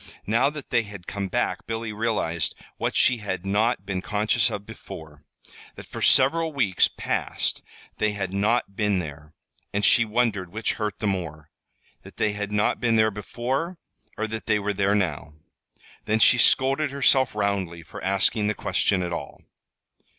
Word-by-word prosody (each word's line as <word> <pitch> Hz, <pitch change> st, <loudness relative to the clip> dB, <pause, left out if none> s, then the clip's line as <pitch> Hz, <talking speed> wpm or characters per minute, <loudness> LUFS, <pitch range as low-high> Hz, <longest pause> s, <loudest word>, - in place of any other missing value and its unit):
Now 115 Hz, +6 st, +3 dB
that 150 Hz, -2 st, -9 dB
they 120 Hz, -, +4 dB
had 100 Hz, -5 st, -10 dB
come 100 Hz, 0 st, -3 dB
back 120 Hz, +5 st, -1 dB
Billy 115 Hz, -1 st, -3 dB
realized 105 Hz, -7 st, -1 dB, 0.2 s
what -, -, -2 dB
she 125 Hz, -, +4 dB
had 95 Hz, -4 st, -4 dB
not 110 Hz, +5 st, +1 dB
been 95 Hz, -2 st, -2 dB
conscious 105 Hz, +3 st, +1 dB
of 100 Hz, 0 st, -5 dB
before: 80 Hz, -9 st, -11 dB, 0.5 s
that -, -, -10 dB
for -, -, -8 dB
several 160 Hz, +5 st, +4 dB
weeks 110 Hz, -10 st, +3 dB
past -, -, -1 dB, 0.4 s
they 105 Hz, -1 st, +1 dB
had 95 Hz, -2 st, -3 dB
not 105 Hz, 0 st, +1 dB
been 105 Hz, -2 st, +1 dB
there; 75 Hz, -3 st, -6 dB, 0.4 s
and 100 Hz, 0 st, 0 dB
she 120 Hz, -, +6 dB
wondered 110 Hz, -5 st, 0 dB
which 110 Hz, +3 st, -1 dB
hurt 105 Hz, -2 st, -3 dB
the -, -, -4 dB
more 80 Hz, -6 st, -3 dB, 0.5 s
that -, -, -14 dB
they 110 Hz, -, +1 dB
had 105 Hz, 0 st, -4 dB
not 105 Hz, 0 st, +1 dB
been 115 Hz, -2 st, +2 dB
there 110 Hz, 0 st, +4 dB
before, 130 Hz, -, -3 dB, 0.4 s
or 110 Hz, -, -1 dB
that 110 Hz, 0 st, -6 dB
they 105 Hz, -, +3 dB
were 105 Hz, 0 st, -1 dB
there 100 Hz, +1 st, +2 dB
now. 80 Hz, -6 st, -2 dB, 0.7 s
Then 110 Hz, -, +2 dB
she 120 Hz, +3 st, +5 dB
scolded 135 Hz, +5 st, +3 dB
herself 130 Hz, -3 st, +3 dB
roundly 100 Hz, -5 st, -1 dB
for -, -, -10 dB
asking 100 Hz, +3 st, +1 dB
the 105 Hz, -, 0 dB
question 95 Hz, -1 st, +1 dB
at 85 Hz, -1 st, -3 dB
all. 75 Hz, -4 st, -7 dB
105 Hz, 170 wpm, -25 LUFS, 95-115 Hz, 0.7 s, she